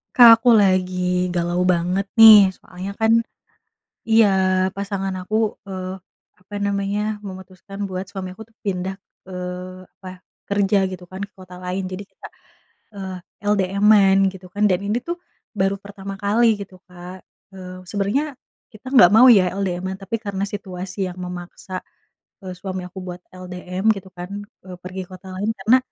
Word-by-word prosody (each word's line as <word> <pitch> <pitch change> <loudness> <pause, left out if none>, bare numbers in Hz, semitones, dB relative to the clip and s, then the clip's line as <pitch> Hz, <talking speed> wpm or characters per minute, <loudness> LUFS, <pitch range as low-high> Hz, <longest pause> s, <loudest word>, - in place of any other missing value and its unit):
Kak, 230 -2 +9
aku 245 - +4
lagi 180 -2 +1
galau 175 0 -1
banget 180 +3 0
nih, 215 -3 +10
soalnya 185 +2 -8
kan 220 0 +2 1.0
iya 225 -1 +6 0.5
pasangan 195 -1 -3
aku, 215 +4 -3 0.3
eee, 185 -1 -5 0.4
apa 185 +3 -18
namanya, 200 0 -1 0.2
memutuskan 190 0 -10
buat 185 -1 -4
suami 185 -2 -6
aku 220 - -9
tuh 225 - -39
pindah, 190 -1 -2 0.3
eee, 180 0 -7
apa, 185 -1 -11 0.3
kerja 200 0 +2
gitu 185 -1 -8
kan 190 +2 -8
ke 200 - -8
kota 185 -1 -12
lain. 185 +1 -3
Jadi 185 +2 -6
kita, 200 - -13 0.7
eee, 190 -1 -6 0.4
LDM-an 200 0 +4 0.2
gitu 185 -1 -12
kan, 205 - -1
dan 180 -2 +2
ini 210 +3 0
tuh 345 - -1 0.4
baru 195 0 +1
pertama 195 0 -8
kali 215 +3 +3
gitu 195 -1 -9
Kak. 180 0 -11 0.3
Eee, 185 -1 -9
sebenernya 220 - -1 0.4
kita 215 +4 -14
nggak 175 -7 +8
mau 250 +3 +8
ya 185 -5 +5
LDM-an, 190 -1 -2
tapi 195 - -2
karena 200 -3 -4
situasi 190 -1 -5
yang 180 - -7
memaksa, 180 +1 -7 0.6
eee, 185 -1 -7
suami 185 0 -5
aku 190 - -9
buat 180 -1 -7
LDM 185 +2 -3
gitu 195 -2 -10
kan, 180 +1 -8 0.4
eee, 185 -1 -9
pergi 185 +1 -6
ke - - -30
kota 190 +1 -11
lain. 205 +4 -1
Karena 220 +7 +5
190 Hz, 155 wpm, -21 LUFS, 185-200 Hz, 1.0 s, nih